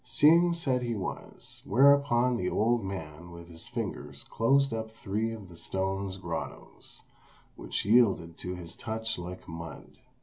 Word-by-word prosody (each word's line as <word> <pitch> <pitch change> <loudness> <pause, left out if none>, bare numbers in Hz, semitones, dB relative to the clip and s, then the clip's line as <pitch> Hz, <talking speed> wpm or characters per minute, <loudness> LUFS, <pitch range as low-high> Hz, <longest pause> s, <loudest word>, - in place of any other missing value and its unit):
Hsing 165 +7 +5
said 135 -7 +1
he 120 -2 -2
was; 95 -3 -6
whereupon 125 +1 +4
the 90 -6 -1
old 115 +1 +2
man 85 -3 -6
with 85 0 -11
his 80 -1 -10
fingers - - -5
closed 135 +3 +2
up 110 0 -3
three 110 0 -2
of 110 -4 -8
the 85 - -13
stone's 95 +2 -2
grottoes, 80 -7 -7 0.5
which - - -3
yielded 100 -7 +4
to 90 0 -4
his 85 -1 -7
touch 110 -2 -3
like 90 +1 -8
mud. 80 -1 -9
100 Hz, 145 wpm, -29 LUFS, 85-120 Hz, 0.5 s, Hsing